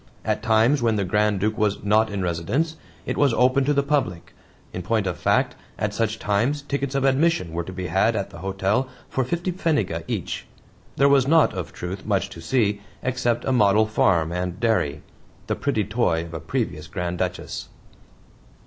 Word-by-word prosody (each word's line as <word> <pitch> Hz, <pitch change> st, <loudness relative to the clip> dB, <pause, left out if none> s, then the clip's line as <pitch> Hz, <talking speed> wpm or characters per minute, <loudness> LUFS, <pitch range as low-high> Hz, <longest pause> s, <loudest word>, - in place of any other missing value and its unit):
At -, -, 0 dB
times, 115 Hz, +5 st, +3 dB
when 115 Hz, -2 st, +2 dB
the 100 Hz, -, 0 dB
Grand 105 Hz, +2 st, +1 dB
Duke 110 Hz, +2 st, -1 dB
was 105 Hz, -1 st, 0 dB
"not 110 Hz, +2 st, +3 dB
in 100 Hz, -2 st, -3 dB
residence," 90 Hz, -, -1 dB, 0.3 s
it -, -, -3 dB
was 140 Hz, -5 st, +3 dB
open 130 Hz, +2 st, +3 dB
to 145 Hz, -, +2 dB
the 140 Hz, -, +3 dB
public. 140 Hz, -, -1 dB, 0.4 s
In 90 Hz, -, -4 dB
point 110 Hz, +3 st, 0 dB
of 90 Hz, -2 st, -1 dB
fact, -, -, +1 dB, 0.2 s
at -, -, -1 dB
such 115 Hz, -1 st, -1 dB
times 115 Hz, +10 st, 0 dB
tickets 140 Hz, -1 st, -2 dB
of 135 Hz, -, +1 dB
admission 135 Hz, -, +2 dB
were 85 Hz, -, -1 dB
to 95 Hz, -, -8 dB
be 90 Hz, 0 st, -5 dB
had 95 Hz, +6 st, +2 dB
at 100 Hz, -2 st, -3 dB
the -, -, -10 dB
hotel 95 Hz, +7 st, 0 dB, 0.2 s
for 130 Hz, -, 0 dB
fifty 170 Hz, +8 st, -2 dB
pfennige 145 Hz, -, 0 dB
each. -, -, -4 dB, 0.5 s
There 140 Hz, -, +4 dB
was 140 Hz, -2 st, +4 dB
not, 160 Hz, +1 st, +5 dB
of 90 Hz, -4 st, -5 dB
truth, 95 Hz, +2 st, -6 dB
much 100 Hz, -2 st, 0 dB
to 80 Hz, -, -9 dB
see 105 Hz, +1 st, +1 dB, 0.2 s
except 120 Hz, -2 st, 0 dB
a -, -, +1 dB
model 105 Hz, -3 st, +4 dB
farm 85 Hz, -6 st, +2 dB
and 90 Hz, +1 st, -3 dB
dairy 110 Hz, -11 st, 0 dB, 0.4 s
the -, -, -1 dB
pretty 140 Hz, -7 st, 0 dB
toy 100 Hz, -6 st, 0 dB
of 85 Hz, -, -11 dB
a 80 Hz, -, -4 dB
previous 75 Hz, +1 st, -3 dB
Grand 90 Hz, -1 st, -3 dB
Duchess. -, -, -3 dB
105 Hz, 190 wpm, -24 LUFS, 90-130 Hz, 0.5 s, not